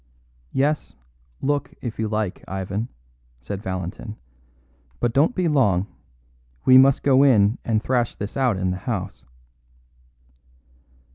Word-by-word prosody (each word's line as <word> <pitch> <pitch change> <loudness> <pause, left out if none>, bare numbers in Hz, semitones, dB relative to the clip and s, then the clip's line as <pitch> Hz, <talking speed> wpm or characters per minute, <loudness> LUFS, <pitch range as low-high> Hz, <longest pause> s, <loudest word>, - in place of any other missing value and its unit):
"Yes; 145 +3 0 0.5
look, 145 +1 -1
if 120 -3 -6
you 110 - 0
like, 105 -3 -3
Ivan," 95 +4 -3 0.5
said 95 +10 -6
Valentin, 95 +3 -5 0.8
"but 120 -1 0
don't 155 - +3
be 185 -2 +1
long. 105 - +2 0.8
We 130 - +7
must 135 0 +4
go 135 -1 +5
in 115 -5 +4
and 110 -1 0
thrash 125 -3 0
this 100 +1 -6
out 130 -7 +1
in 95 0 0
the 90 - -3
house." - - -4
115 Hz, 125 wpm, -23 LUFS, 100-135 Hz, 0.8 s, We